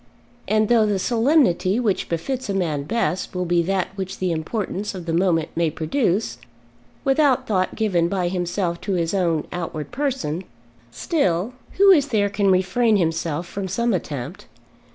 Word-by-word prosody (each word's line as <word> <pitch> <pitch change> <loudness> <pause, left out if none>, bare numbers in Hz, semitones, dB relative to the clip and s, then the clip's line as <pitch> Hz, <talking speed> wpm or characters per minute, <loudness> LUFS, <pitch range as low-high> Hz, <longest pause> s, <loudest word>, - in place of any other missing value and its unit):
And 215 0 +2
though 225 -2 +4
the 205 -1 +1
solemnity 230 - +2
which 215 -6 0
befits 225 +9 -3
a 200 - -1
man 155 -7 -1
best 190 -3 -1
will 180 0 -1
be 175 0 +2
that 190 +1 -1
which 195 -1 -5
the 185 -1 -1
importance 195 +4 -3
of 180 -2 -7
the 165 - -2
moment 165 -2 +2
may 170 -1 +2
produce, 170 - -1 0.6
without 275 -1 +3
thought 185 -3 0
given 185 -7 +1
by 180 -1 -1
himself 175 -1 -2
to 200 - -2
his 170 -1 0
own 170 -5 +1
outward 165 -3 -5
person, 245 - -2 0.5
still, 185 - 0 0.2
who 395 +1 +6
is 290 -6 +5
there 205 -6 +1
can 200 -1 +1
refrain 210 +5 +3
himself 165 -2 -1
from 195 +2 -5
some 235 +5 0
attempt? 145 -8 -5
190 Hz, 160 wpm, -22 LUFS, 170-225 Hz, 0.6 s, who